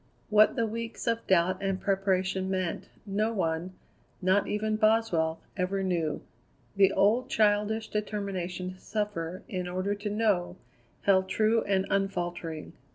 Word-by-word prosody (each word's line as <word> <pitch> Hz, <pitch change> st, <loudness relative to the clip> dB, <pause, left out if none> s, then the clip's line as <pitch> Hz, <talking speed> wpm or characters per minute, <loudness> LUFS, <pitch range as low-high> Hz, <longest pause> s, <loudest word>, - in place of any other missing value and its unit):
What 215 Hz, 0 st, +6 dB
the 230 Hz, -, +1 dB
weeks 230 Hz, +1 st, -5 dB
of 230 Hz, -1 st, -1 dB
doubt 185 Hz, +1 st, +3 dB
and 195 Hz, -1 st, -1 dB
preparation 190 Hz, -1 st, 0 dB
meant, 185 Hz, -3 st, -2 dB, 0.2 s
no 210 Hz, +2 st, 0 dB
one, 175 Hz, -3 st, -1 dB, 0.5 s
not 190 Hz, +2 st, +2 dB
even 215 Hz, +1 st, 0 dB
Boswell, 215 Hz, -8 st, +2 dB, 0.2 s
ever 190 Hz, +1 st, -1 dB
knew. 170 Hz, -5 st, -1 dB, 0.5 s
The 195 Hz, -1 st, +5 dB
old 230 Hz, +7 st, +3 dB
childish 215 Hz, +1 st, +2 dB
determination 190 Hz, -4 st, -3 dB
to 185 Hz, -, -18 dB
suffer, 190 Hz, -6 st, -3 dB
in 180 Hz, -1 st, -3 dB
order 185 Hz, +3 st, -1 dB
to 205 Hz, +1 st, -4 dB
know, 200 Hz, -5 st, +1 dB, 0.5 s
held 190 Hz, -1 st, +3 dB
true 220 Hz, +2 st, +3 dB
and 195 Hz, -1 st, +1 dB
unfaltering. 175 Hz, -5 st, -2 dB
195 Hz, 135 wpm, -29 LUFS, 185-210 Hz, 0.5 s, What